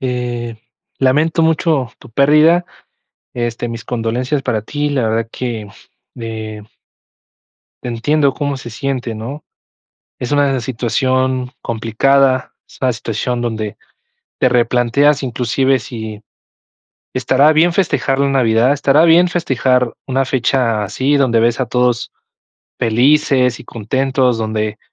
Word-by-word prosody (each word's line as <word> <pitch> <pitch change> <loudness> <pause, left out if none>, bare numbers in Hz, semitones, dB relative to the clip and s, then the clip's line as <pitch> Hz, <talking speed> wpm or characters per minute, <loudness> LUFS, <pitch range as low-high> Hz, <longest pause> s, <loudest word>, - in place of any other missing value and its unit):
Eh, 120 -2 -3 0.4
lamento 150 +5 +2
mucho 160 -6 +1
tu - - -15
pérdida. 150 +7 +4 0.7
Este, 120 0 -3
mis 115 -1 -7
condolencias 125 +4 -2
para 110 -5 -1
ti. 145 +6 -2
La 135 -4 0
verdad 115 0 -1
que, 115 -5 -4 0.5
eh 110 -2 -6 1.2
entiendo 135 +4 +1
cómo 145 -2 -2
se 120 - -9
siente, 125 -1 -3
¿no? 135 +7 -7 0.8
Es 125 - -4
una 140 -3 +2
situación 130 +2 -1
complicada. 130 +4 +1 0.2
Es - - -17
una 130 -2 +2
situación 120 +2 -3
donde, 110 -3 -3 0.6
te 125 - +3
replanteas 125 +4 +2
inclusive, 130 +2 +1
si 110 -2 -8 0.9
estará 130 +4 +3
bien 165 +2 +3
festejar 140 -7 0
la 140 0 +2
Navidad, 120 -1 +3
estará 145 +2 +3
bien 170 +2 +5
festejar 130 -7 0
una 135 +1 +1
fecha 125 -4 0
así 130 +8 0
donde 125 -5 +2
ves 120 +2 +1
a 130 - +1
todos 125 0 0 0.7
felices 125 +1 +2
y - - -11
contentos, 130 +2 0
donde, 110 -1 -2
125 Hz, 120 wpm, -16 LUFS, 115-140 Hz, 1.2 s, bien